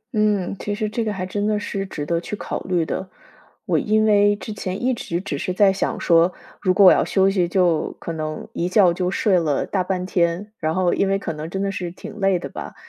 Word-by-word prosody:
嗯， 210 Hz, -3 st, +1 dB
其 205 Hz, -, -3 dB
实 215 Hz, 0 st, -2 dB
这 225 Hz, +2 st, -2 dB
个 215 Hz, -, -1 dB
还 190 Hz, -2 st, -4 dB
真 205 Hz, +3 st, -2 dB
的 210 Hz, -1 st, +1 dB
是 195 Hz, -1 st, -4 dB
值 150 Hz, -6 st, -5 dB
得 170 Hz, +2 st, 0 dB
去 195 Hz, -, -5 dB
考 -, -, -4 dB
虑 180 Hz, -3 st, 0 dB
的。 185 Hz, +3 st, -4 dB, 0.6 s
我 -, -, +2 dB
因 215 Hz, 0 st, +2 dB
为 205 Hz, -1 st, +4 dB
之 215 Hz, +1 st, -7 dB
前 190 Hz, 0 st, -5 dB
一 255 Hz, +1 st, +2 dB
直 170 Hz, -7 st, -3 dB
只 150 Hz, -6 st, -4 dB
是 185 Hz, -, -2 dB
在 195 Hz, +1 st, +4 dB
想 195 Hz, -, -2 dB
说， 170 Hz, +1 st, +4 dB, 0.3 s
如 185 Hz, -, +2 dB
果 195 Hz, +2 st, +5 dB
我 185 Hz, -, +10 dB
要 -, -, +4 dB
休 195 Hz, 0 st, +2 dB
息 185 Hz, -3 st, +1 dB
就 175 Hz, -3 st, +1 dB
可 -, -, -5 dB
能 155 Hz, -1 st, -5 dB
一 175 Hz, -, -1 dB
觉 185 Hz, -3 st, +5 dB
就 180 Hz, +1 st, -1 dB
睡 190 Hz, -1 st, +2 dB
了 150 Hz, -4 st, 0 dB
大 190 Hz, -2 st, -1 dB
半 180 Hz, 0 st, -2 dB
天， 180 Hz, +3 st, 0 dB
然 160 Hz, 0 st, -1 dB
后 185 Hz, -2 st, +2 dB
因 195 Hz, -, +1 dB
为 195 Hz, 0 st, +2 dB
可 170 Hz, -4 st, -4 dB
能 155 Hz, +1 st, -6 dB
真 195 Hz, +3 st, -3 dB
的 200 Hz, -, -1 dB
是 180 Hz, -3 st, -4 dB
挺 195 Hz, +4 st, -10 dB
累 195 Hz, -2 st, +3 dB
的 155 Hz, -, -6 dB
吧。 -, -, -8 dB
185 Hz, 265 characters per minute, -22 LUFS, 175-205 Hz, 0.6 s, 我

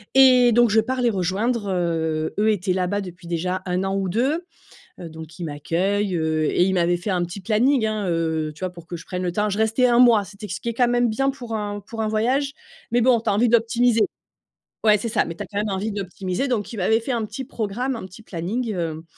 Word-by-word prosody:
Et 255 Hz, -2 st, +7 dB
donc, 240 Hz, +1 st, +5 dB
je 220 Hz, +1 st, +4 dB
pars 255 Hz, +3 st, -3 dB
les 240 Hz, -, +3 dB
rejoindre, 205 Hz, +3 st, -1 dB
heu, 160 Hz, -3 st, -1 dB
eux 215 Hz, +1 st, +3 dB
étaient 190 Hz, -2 st, 0 dB
là-bas 185 Hz, +2 st, 0 dB
depuis 180 Hz, -2 st, -8 dB
déjà 180 Hz, +2 st, -2 dB
1 180 Hz, +1 st, -1 dB
an 195 Hz, 0 st, -1 dB
ou 195 Hz, -1 st, -1 dB
2. 270 Hz, -, 0 dB, 0.5 s
Heu, 170 Hz, -, -7 dB
donc 160 Hz, 0 st, -10 dB
ils 180 Hz, -, -6 dB
m'accueillent, 180 Hz, +7 st, -1 dB
heu, 160 Hz, -1 st, 0 dB
et 175 Hz, -, +2 dB
ils 190 Hz, -, +1 dB
m'avaient 175 Hz, -1 st, +2 dB
fait 195 Hz, +4 st, -3 dB
un 180 Hz, -2 st, +1 dB
petit 175 Hz, +3 st, -6 dB
planning, 230 Hz, +5 st, +2 dB
hein, 215 Hz, -2 st, -1 dB
heu, 160 Hz, -2 st, -1 dB
tu -, -, -17 dB
vois, 185 Hz, -1 st, -2 dB
pour 170 Hz, -2 st, -13 dB
que 180 Hz, -, -5 dB
je 165 Hz, -, -9 dB
prenne 180 Hz, 0 st, -4 dB
le 180 Hz, -1 st, -1 dB
temps. 210 Hz, +4 st, 0 dB
Je 200 Hz, -, -2 dB
restais 220 Hz, +3 st, +2 dB
un 240 Hz, -1 st, +4 dB
mois, 235 Hz, -5 st, +6 dB
c'était 200 Hz, +2 st, -10 dB
ce 190 Hz, -, -5 dB
qui 235 Hz, -, -3 dB
est -, -, -2 dB
quand 245 Hz, +1 st, +3 dB
même 245 Hz, 0 st, +2 dB
bien 270 Hz, +5 st, +1 dB
pour 245 Hz, -4 st, -6 dB
un 205 Hz, -1 st, -3 dB
pour 225 Hz, +2 st, -6 dB
un 220 Hz, -, 0 dB
voyage. 255 Hz, +6 st, 0 dB, 0.4 s
Mais 240 Hz, +1 st, +3 dB
bon, 245 Hz, 0 st, +4 dB
tu 220 Hz, -, -2 dB
as -, -, +2 dB
envie 225 Hz, +5 st, +3 dB
d'optimiser 230 Hz, 0 st, +3 dB, 0.8 s
Ouais, 215 Hz, -1 st, +5 dB
c'est 230 Hz, +3 st, -4 dB
ça, -, -, +1 dB
mais 165 Hz, -, -5 dB
tu -, -, -6 dB
as -, -, -7 dB
quand 200 Hz, -, -5 dB
même 210 Hz, +1 st, -1 dB
envie 200 Hz, +2 st, -2 dB
d'optimiser. 190 Hz, +3 st, -3 dB
Donc, 230 Hz, -4 st, -2 dB
il 225 Hz, -, -7 dB
m'avait 220 Hz, +5 st, +2 dB
fait 245 Hz, +3 st, -3 dB
un 230 Hz, -3 st, -1 dB
petit 225 Hz, +6 st, -6 dB
programme, 245 Hz, +1 st, -3 dB
un 205 Hz, -, -7 dB
petit 185 Hz, +4 st, -14 dB
planning, 215 Hz, +6 st, -3 dB
hem, 165 Hz, -3 st, -3 dB
205 Hz, 255 wpm, -23 LUFS, 180-235 Hz, 0.8 s, Et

